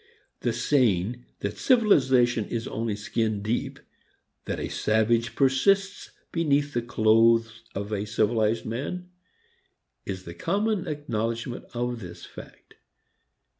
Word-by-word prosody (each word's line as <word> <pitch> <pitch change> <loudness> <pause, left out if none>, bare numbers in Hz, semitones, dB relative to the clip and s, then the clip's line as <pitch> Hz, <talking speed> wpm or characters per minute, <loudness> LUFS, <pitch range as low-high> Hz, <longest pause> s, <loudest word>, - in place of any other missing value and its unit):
The - - 0
saying 120 -3 +1 0.2
that 100 - -4
civilization 130 - +4
is 115 +1 -4
only 115 -1 -2
skin 105 0 -1
deep, 110 +3 -2 0.7
that - - -3
a - - -3
savage 115 +2 +1
persists 195 +9 +2 0.2
beneath 145 -3 +1
the 120 - 0
clothes 115 0 +3
of 100 +2 -4
a 105 -1 -1
civilized 110 +1 +1
man, 175 +11 -4 0.9
is 95 -1 -5
the 85 - -8
common 205 - -1
acknowledgment 120 -5 -3
of 120 0 -2
this 90 -5 -9
fact. - - -13
115 Hz, 115 wpm, -26 LUFS, 110-140 Hz, 0.9 s, civilization